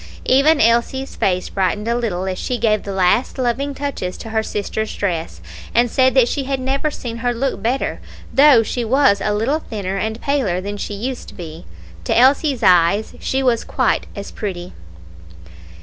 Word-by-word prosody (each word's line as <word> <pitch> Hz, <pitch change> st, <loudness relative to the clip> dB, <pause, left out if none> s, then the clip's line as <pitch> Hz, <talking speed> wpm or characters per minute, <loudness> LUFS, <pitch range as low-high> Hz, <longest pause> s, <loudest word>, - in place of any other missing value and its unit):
Even 285 Hz, +4 st, +4 dB
Elsie's 235 Hz, +4 st, +1 dB
face 185 Hz, -1 st, 0 dB
brightened 195 Hz, +3 st, -1 dB
a 235 Hz, -, +1 dB
little 205 Hz, -7 st, -2 dB
as 185 Hz, -1 st, -3 dB
she 250 Hz, -, -2 dB
gave 215 Hz, -2 st, +1 dB
the 200 Hz, -, -6 dB
last 190 Hz, +8 st, +1 dB
loving 265 Hz, +3 st, -1 dB
touches 270 Hz, -11 st, -4 dB
to 225 Hz, -, -8 dB
her 220 Hz, 0 st, +1 dB
sister's 220 Hz, 0 st, -3 dB
dress, 165 Hz, -, -3 dB, 0.3 s
and 240 Hz, 0 st, +3 dB
said 260 Hz, 0 st, +3 dB
that 255 Hz, -3 st, +5 dB
she 275 Hz, +2 st, -2 dB
had 270 Hz, 0 st, -2 dB
never 270 Hz, +3 st, -1 dB
seen 235 Hz, -5 st, -6 dB
her 245 Hz, +1 st, -1 dB
look 265 Hz, +3 st, -2 dB
better, 250 Hz, +4 st, -1 dB, 0.3 s
though 275 Hz, -4 st, +6 dB
she 240 Hz, +3 st, -3 dB
was 230 Hz, -4 st, +3 dB
a 210 Hz, -, 0 dB
little 230 Hz, +9 st, 0 dB
thinner 200 Hz, -8 st, -5 dB
and 220 Hz, +3 st, -3 dB
paler 255 Hz, -12 st, 0 dB
than 200 Hz, +2 st, -5 dB
she 205 Hz, 0 st, -5 dB
used 250 Hz, +5 st, -5 dB
to -, -, -12 dB
be 165 Hz, -2 st, -9 dB, 0.4 s
to -, -, 0 dB
Elsie's 265 Hz, 0 st, +3 dB
eyes 185 Hz, +2 st, +4 dB
she 265 Hz, 0 st, -1 dB
was 240 Hz, -3 st, +2 dB
quite -, -, 0 dB
as 200 Hz, -1 st, -7 dB
pretty. 180 Hz, -4 st, -6 dB
230 Hz, 180 wpm, -19 LUFS, 200-265 Hz, 0.4 s, though